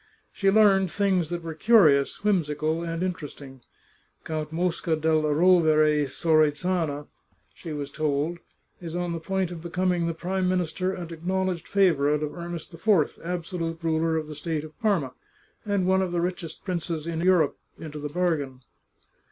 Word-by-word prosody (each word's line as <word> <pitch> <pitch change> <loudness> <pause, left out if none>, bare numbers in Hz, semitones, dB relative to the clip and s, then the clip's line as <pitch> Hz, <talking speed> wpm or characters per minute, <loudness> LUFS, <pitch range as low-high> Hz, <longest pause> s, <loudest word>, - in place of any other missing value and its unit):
She 195 - +1
learned 195 -2 +5
things 190 -4 +1
that 175 -1 -4
were 165 -1 -5
curious, 160 -7 +4
whimsical, 160 -5 0
and 165 +1 -3
interesting. 145 -7 -6 0.6
Count 155 -1 -4
Mosca 170 -1 0
della 155 -1 +1
Rovere 155 -3 +4
Sorezana, 155 +1 +1 0.5
she 165 - -9
was 145 -2 -5
told, 155 +3 -1 0.4
is 170 -1 -6
on 175 -1 -2
the 165 - -3
point 190 +1 -2
of 170 -2 -7
becoming 175 0 0
the 165 - -2
Prime 185 +2 -1
Minister 185 0 -1
and 175 -3 -6
acknowledged 185 +1 -2
favour 165 -8 +3
ite 150 - -2
of 150 - -3
Ernest 170 -1 -7
IV, 170 -2 +1
absolute 170 -1 -3
ruler 160 0 +1
of 155 - -2
the 155 - -7
state 150 0 -3
of 155 0 -11
Parma, 190 - 0 0.5
and 200 -3 +1
one 190 +1 +3
of 185 -2 -1
the 175 - 0
richest 175 -2 -4
princes 170 -4 -3
in 165 -1 -3
Europe 175 -5 +3 0.2
into 150 -2 -8
the 150 0 -4
bargain. 145 -6 -1
165 Hz, 160 wpm, -26 LUFS, 155-180 Hz, 0.6 s, learned